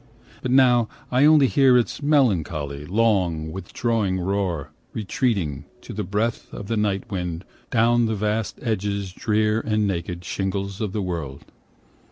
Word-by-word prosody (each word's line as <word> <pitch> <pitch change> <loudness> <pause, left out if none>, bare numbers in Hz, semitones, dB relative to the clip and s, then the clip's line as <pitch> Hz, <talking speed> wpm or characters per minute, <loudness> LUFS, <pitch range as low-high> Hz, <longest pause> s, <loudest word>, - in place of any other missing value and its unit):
But 130 - -3
now 125 -3 +4 0.2
I 130 +3 +4
only 150 -2 +6
hear 130 +2 +5
Its 120 +4 -1
melancholy, 80 - +1
long, 90 -7 +1
withdrawing 95 +2 -1
roar, 90 -5 -2 0.2
25 - - -26
Retreating, 95 - -1 0.2
to - - -9
the 105 - -3
breath 105 +5 -2
Of 100 - -7
the 115 - 0
night 105 -2 -1
wind, 90 -2 -3 0.2
down 120 0 +3
the 110 - -1
vast 105 +1 -1
edges 100 -4 -2
drear 105 +2 +1
And 110 -2 0
naked 90 -2 -3
shingles 95 +2 -3
of 105 -3 -1
the 105 - -1
world. 80 -7 -5
100 Hz, 150 wpm, -23 LUFS, 90-115 Hz, 0.2 s, only